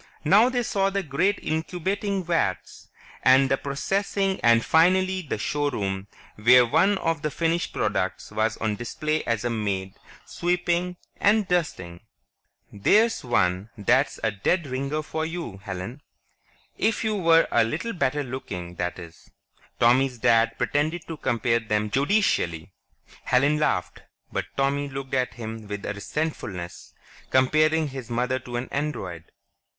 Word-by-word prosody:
Now 205 Hz, +10 st, +6 dB
they 245 Hz, -1 st, 0 dB
saw 195 Hz, -3 st, +1 dB
the 195 Hz, 0 st, -2 dB
great 180 Hz, +7 st, +1 dB
incubating 185 Hz, +5 st, -2 dB
vats, 165 Hz, -, -2 dB, 0.3 s
and 130 Hz, +1 st, +5 dB
the 135 Hz, -, +3 dB
processing 195 Hz, +8 st, -1 dB
and 115 Hz, -1 st, +4 dB
finally 185 Hz, +3 st, +3 dB
the 145 Hz, -9 st, -4 dB
showroom 105 Hz, -8 st, -2 dB, 0.3 s
where 125 Hz, +3 st, +6 dB
one 195 Hz, -, +3 dB
of 165 Hz, -4 st, -1 dB
the 150 Hz, -, -1 dB
finished 165 Hz, +3 st, -1 dB
products -, -, -2 dB
was 110 Hz, +1 st, 0 dB
on 110 Hz, -2 st, -2 dB
display 155 Hz, +7 st, -2 dB
as 115 Hz, -1 st, -1 dB
a 120 Hz, -, 0 dB
maid, 100 Hz, -4 st, -2 dB, 0.3 s
sweeping 180 Hz, 0 st, -1 dB, 0.2 s
and 210 Hz, 0 st, +3 dB
dusting. 90 Hz, -, -2 dB, 0.7 s
"There's 215 Hz, -, +3 dB
one 95 Hz, -4 st, +1 dB
that's 120 Hz, +7 st, +2 dB
a 110 Hz, -, +2 dB
dead 150 Hz, -, 0 dB
ringer 140 Hz, +3 st, -3 dB
for 160 Hz, +1 st, -3 dB
you, 160 Hz, -, -5 dB
Helen. 100 Hz, +6 st, -7 dB, 0.8 s
If 225 Hz, +1 st, +1 dB
you 220 Hz, -1 st, 0 dB
were 165 Hz, -4 st, +4 dB
a -, -, +4 dB
little 160 Hz, -, -3 dB
better 145 Hz, -3 st, 0 dB
looking, 90 Hz, -9 st, -6 dB
that 90 Hz, 0 st, -2 dB
is." 85 Hz, -3 st, -12 dB, 0.5 s
Tommy's 125 Hz, +2 st, +3 dB
dad 115 Hz, -1 st, +3 dB
pretended 155 Hz, +4 st, -1 dB
to 165 Hz, -, -5 dB
compare 115 Hz, -3 st, +1 dB
them 105 Hz, -2 st, -1 dB
judicially. 135 Hz, -, +1 dB, 0.5 s
Helen 140 Hz, +4 st, +3 dB
laughed, 120 Hz, -, -1 dB, 0.3 s
but -, -, -2 dB
Tommy 140 Hz, +1 st, 0 dB
looked 135 Hz, 0 st, -7 dB
at 130 Hz, -1 st, 0 dB
him 110 Hz, -2 st, -7 dB
with 105 Hz, -1 st, -5 dB
a -, -, -2 dB
resentfulness. 100 Hz, -, -5 dB, 0.3 s
Comparing 155 Hz, +4 st, +3 dB
his 130 Hz, -3 st, -8 dB
mother 125 Hz, +2 st, 0 dB
to 120 Hz, -1 st, -8 dB
an 120 Hz, +2 st, -3 dB
Android.... 95 Hz, -, -4 dB
135 Hz, 140 wpm, -25 LUFS, 110-165 Hz, 0.8 s, Now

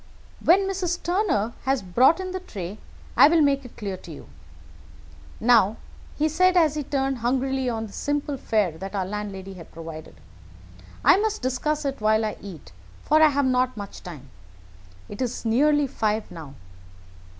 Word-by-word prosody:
"When 365 Hz, +4 st, +5 dB
Mrs. 360 Hz, -3 st, -2 dB
Turner 340 Hz, -, 0 dB
has 265 Hz, -5 st, +1 dB
brought 255 Hz, -, +4 dB
in 370 Hz, -1 st, -4 dB
the 375 Hz, -, -3 dB
tray 205 Hz, -, -7 dB, 0.4 s
I -, -, +8 dB
will 325 Hz, +1 st, +4 dB
make 280 Hz, -1 st, +2 dB
it 250 Hz, -, -13 dB
clear 195 Hz, -3 st, -4 dB
to -, -, -12 dB
you. -, -, -11 dB, 1.1 s
Now," 225 Hz, -2 st, +4 dB, 0.4 s
he 305 Hz, -, +2 dB
said, 365 Hz, +4 st, +3 dB
as 315 Hz, -4 st, +4 dB
he 305 Hz, -, -2 dB
turned 270 Hz, -2 st, -1 dB
hungrily 260 Hz, +2 st, 0 dB
on 225 Hz, -2 st, -3 dB
the 205 Hz, -, -12 dB
simple 290 Hz, 0 st, -2 dB
fare 205 Hz, -, -1 dB
that 195 Hz, +1 st, -6 dB
our 190 Hz, -2 st, -1 dB
landlady 195 Hz, -1 st, -6 dB
had 175 Hz, -3 st, -12 dB
provided, 160 Hz, -1 st, -9 dB, 0.9 s
"I -, -, +7 dB
must 430 Hz, -5 st, -1 dB
discuss 290 Hz, +4 st, -1 dB
it 275 Hz, -4 st, -3 dB
while 215 Hz, +1 st, +3 dB
I 215 Hz, -, -3 dB
eat, 185 Hz, -, -10 dB, 0.3 s
for 310 Hz, +1 st, +3 dB
I 315 Hz, -, +8 dB
have 285 Hz, -1 st, +1 dB
not 255 Hz, -1 st, +1 dB
much 200 Hz, -1 st, -8 dB
time. 145 Hz, -7 st, -10 dB, 0.8 s
It 205 Hz, -, -8 dB
is 245 Hz, -1 st, -3 dB
nearly 290 Hz, +6 st, +3 dB
five 220 Hz, -5 st, -2 dB
now. 155 Hz, -5 st, -10 dB
250 Hz, 170 wpm, -24 LUFS, 205-295 Hz, 1.1 s, I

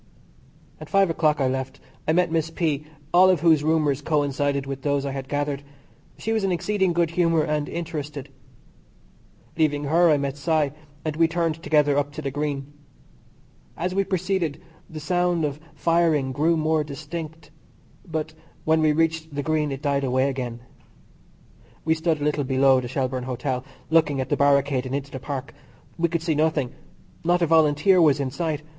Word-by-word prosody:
At -, -, -10 dB
five 195 Hz, -3 st, +3 dB
o'clock 155 Hz, -2 st, +1 dB
I 135 Hz, -, +2 dB
left. 130 Hz, 0 st, -3 dB, 0.3 s
I 155 Hz, -, +3 dB
met 180 Hz, -1 st, +2 dB
Miss 165 Hz, -1 st, 0 dB
P., 155 Hz, -3 st, -2 dB, 0.3 s
all 185 Hz, +2 st, +7 dB
of 180 Hz, -5 st, +2 dB
whose 160 Hz, -3 st, +4 dB
rumours 150 Hz, -3 st, +1 dB
coincided 145 Hz, -2 st, 0 dB
with 135 Hz, 0 st, -5 dB
those 140 Hz, 0 st, 0 dB
I 140 Hz, -, -2 dB
had 135 Hz, 0 st, -6 dB
gathered. 145 Hz, -1 st, -1 dB, 0.6 s
She 225 Hz, -, -3 dB
was 220 Hz, -2 st, 0 dB
in 195 Hz, -, +1 dB
exceeding 190 Hz, +1 st, +1 dB
good 170 Hz, -1 st, +1 dB
humour 165 Hz, -2 st, +2 dB
and 150 Hz, -1 st, -1 dB
interested. 150 Hz, -4 st, -5 dB, 1.3 s
Leaving 150 Hz, -2 st, +1 dB
her 165 Hz, +4 st, +4 dB
I 150 Hz, -, +4 dB
met 140 Hz, 0 st, -3 dB
Cy, 155 Hz, -1 st, +1 dB, 0.3 s
and 155 Hz, -1 st, -2 dB
we 165 Hz, 0 st, +5 dB
turned 165 Hz, -1 st, -1 dB
together 145 Hz, -3 st, +3 dB
up 145 Hz, 0 st, -2 dB
to 155 Hz, -, -6 dB
the 140 Hz, -, -2 dB
Green. 145 Hz, 0 st, -3 dB, 1.0 s
As 180 Hz, +2 st, -2 dB
we 195 Hz, +1 st, +2 dB
proceeded, 185 Hz, -5 st, -1 dB, 0.3 s
the 155 Hz, -, -7 dB
sound 175 Hz, +1 st, +1 dB
of 145 Hz, 0 st, -4 dB, 0.2 s
firing 165 Hz, -5 st, +2 dB
grew 160 Hz, +5 st, +2 dB
more 155 Hz, 0 st, +1 dB
distinct, 155 Hz, +1 st, -7 dB, 0.5 s
but 160 Hz, -3 st, -4 dB, 0.3 s
when 160 Hz, 0 st, +3 dB
we 155 Hz, -1 st, +3 dB
reached 160 Hz, -1 st, 0 dB
the 145 Hz, -, -2 dB
Green 155 Hz, -1 st, 0 dB
it 135 Hz, +1 st, -6 dB
died 140 Hz, -1 st, +1 dB
away 130 Hz, +1 st, +1 dB
again. 125 Hz, -3 st, -4 dB, 1.2 s
We 160 Hz, -, +3 dB
stood 160 Hz, -1 st, 0 dB
a -, -, -4 dB
little 150 Hz, -1 st, 0 dB
below 130 Hz, 0 st, +3 dB
the 125 Hz, -, -5 dB
Shelbourne 130 Hz, 0 st, -2 dB
Hotel, 125 Hz, 0 st, -3 dB, 0.3 s
looking 155 Hz, -4 st, +3 dB
at 130 Hz, 0 st, -2 dB
the -, -, +2 dB
barricade 140 Hz, -2 st, +2 dB
and 130 Hz, -, -3 dB
into 140 Hz, 0 st, -4 dB
the 130 Hz, -, -6 dB
Park. 135 Hz, 0 st, -5 dB, 0.5 s
We 170 Hz, 0 st, +2 dB
could 165 Hz, 0 st, -2 dB
see 165 Hz, -2 st, +1 dB
nothing. 150 Hz, -4 st, +1 dB, 0.5 s
Not 175 Hz, +1 st, +2 dB
a -, -, +5 dB
Volunteer 160 Hz, +3 st, +4 dB
was 150 Hz, -3 st, +4 dB
in 135 Hz, -2 st, -2 dB
sight. 155 Hz, -1 st, -2 dB
150 Hz, 180 wpm, -24 LUFS, 140-165 Hz, 1.3 s, all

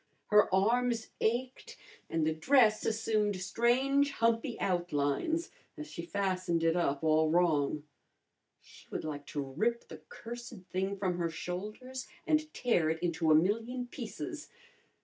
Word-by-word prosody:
Her 210 Hz, 0 st, +6 dB
arms 230 Hz, +4 st, +2 dB
ached, 250 Hz, +3 st, -1 dB, 0.3 s
and 165 Hz, -1 st, 0 dB
the 160 Hz, -, +1 dB
dress 220 Hz, -, +4 dB
assumed 215 Hz, -2 st, +1 dB
strange 260 Hz, +8 st, +2 dB
humpy 230 Hz, 0 st, 0 dB
outlines 175 Hz, -, 0 dB, 0.3 s
as 150 Hz, -, -6 dB
she 170 Hz, -, -5 dB
fastened 185 Hz, -1 st, -1 dB
it 165 Hz, 0 st, +3 dB
up 145 Hz, -4 st, 0 dB
all 155 Hz, 0 st, +3 dB
wrong. 155 Hz, -3 st, +2 dB, 0.8 s
She -, -, -17 dB
would -, -, -4 dB
like 145 Hz, -2 st, -5 dB
to 150 Hz, -, -4 dB
rip 215 Hz, -, -1 dB
the -, -, -10 dB
cursed 240 Hz, -, -8 dB
thing 190 Hz, +2 st, -1 dB
from 185 Hz, -2 st, -1 dB
her 170 Hz, -1 st, 0 dB
shoulders 215 Hz, +10 st, -6 dB, 0.2 s
and 310 Hz, -1 st, +1 dB
tear 205 Hz, -, +1 dB
it 160 Hz, -, 0 dB
into 170 Hz, -2 st, 0 dB
a 155 Hz, -, +7 dB
million 225 Hz, +9 st, +1 dB
pieces! 245 Hz, -, -7 dB
195 Hz, 140 wpm, -32 LUFS, 165-240 Hz, 0.8 s, a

